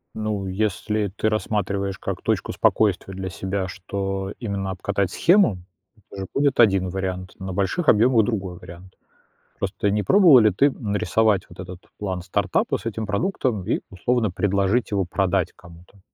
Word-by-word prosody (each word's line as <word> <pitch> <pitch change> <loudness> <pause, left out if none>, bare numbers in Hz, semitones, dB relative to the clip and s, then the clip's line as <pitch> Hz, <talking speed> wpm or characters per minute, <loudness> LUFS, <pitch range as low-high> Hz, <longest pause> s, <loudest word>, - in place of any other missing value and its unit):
Ну, 105 -2 -2
если 105 +2 -1
ты 110 - +1
рассматриваешь 100 -2 -2
как - - -4
точку - - -1
спокойствия 95 -2 +1
для 95 0 -5
себя, 95 +3 -3
что 95 +1 -4
именно 100 -4 -3
обкатать 95 0 -1
схему, 175 - +3 0.5
это 100 - -8
же - - -4
будет 140 -2 +2
один 95 -5 +4
вариант, 95 -1 -4
на 95 -1 -5
больших 100 - -1
объемах- 115 +1 +5
другой 95 -6 -3
вариант. 90 +2 -12 0.7
Просто 105 - -1
не 105 +1 0
пробовала 175 - +7
ли 110 -1 +5
ты 140 +9 +3
нарисовать 105 -2 +1
вот - - -12
этот 90 0 -9
план 95 -3 -3
стартапа 90 - 0
с - - -13
этим 110 -1 -3
продуктом 105 - -1
и, - - 0
условно, 110 +2 0
предложить 100 +4 +1
его 100 -2 +1
продать 90 +1 0
кому-то? 85 +3 -17
100 Hz, 155 wpm, -23 LUFS, 95-110 Hz, 0.7 s, пробовала